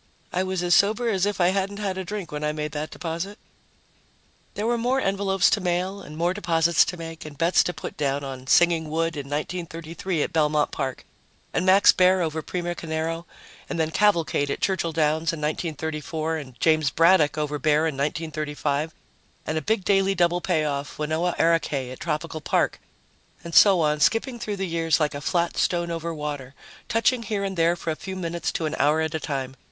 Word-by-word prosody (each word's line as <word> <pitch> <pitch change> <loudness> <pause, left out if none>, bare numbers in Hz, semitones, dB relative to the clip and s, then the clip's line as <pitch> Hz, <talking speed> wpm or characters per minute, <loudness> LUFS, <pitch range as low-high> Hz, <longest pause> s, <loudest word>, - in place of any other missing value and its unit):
I 180 - +1
was 185 -1 -2
as 175 0 +3
sober 220 +4 +3
as 195 -2 +1
if 205 -1 -2
I 175 0 +4
hadn't 195 +1 -1
had 200 -3 -2
a 190 - -3
drink, 200 -1 -5
when 150 0 -4
I 150 - +1
made 150 0 -4
that 150 +1 -4
deposit. 175 +5 -5 1.2
There 210 - -2
were 240 +1 +2
more 250 +3 +1
envelopes 195 -4 +2
to 210 - +2
mail 185 +2 -1
and 155 +1 -10
more 170 +2 +1
deposits 170 -4 +3
to 180 - -5
make 165 -1 -7
and 150 -2 -10
bets 170 +2 +4
to - - 0
put - - -8
down 140 -1 -1
on 130 -1 -7
Singing 165 0 +4
Wood 165 +1 -1
in 140 -2 -5
1933 165 +2 -3
at - - -4
Belmont 150 -2 +2
Park 135 -3 -4 0.5
and 185 - 0
Max 195 +2 +7
Baer 185 0 +4
over 160 -1 -2
Primo 175 +1 -3
Carnera, 165 0 -3 0.4
and 170 - -3
then 160 0 0
Cavalcade 170 -7 +2
at - - -2
Churchill 185 -4 0
Downs 160 0 +1
in 165 - -5
1934, 155 +1 -3
and 130 -5 -10
James 155 -3 +3
Braddock 160 -1 +4
over 150 -1 -2
Baer 150 +2 +3
in 160 - 0
1935, 150 +1 -2 0.5
and 155 - -2
a 155 - 0
big 205 +2 0
daily 195 -1 +3
double 175 0 +2
payoff, 150 -5 -1
Wanoah 160 +3 -1
Arakay 150 -6 +1
at 130 - -9
Tropical 155 0 -3
Park, - - 0 0.6
and 170 - -8
so 195 -2 +7
on, 150 -1 +1
skipping 235 - +1
through 210 -3 -3
the 195 - -2
years 165 -2 +1
like 150 -2 +1
a 145 - -5
flat 170 +3 0
stone 170 -1 +1
over 165 0 -3
water, 145 -4 -5 0.3
touching 230 +2 +2
here 210 -3 -2
and 195 -1 -3
there 170 0 +3
for 165 - -3
a - - -2
few 190 +4 -7
minutes 170 -2 -3
to 160 - -2
an 155 - -2
hour 150 +2 +3
at 160 -1 -1
a 160 - -1
time. 135 -3 -4
165 Hz, 200 wpm, -24 LUFS, 150-185 Hz, 1.2 s, Max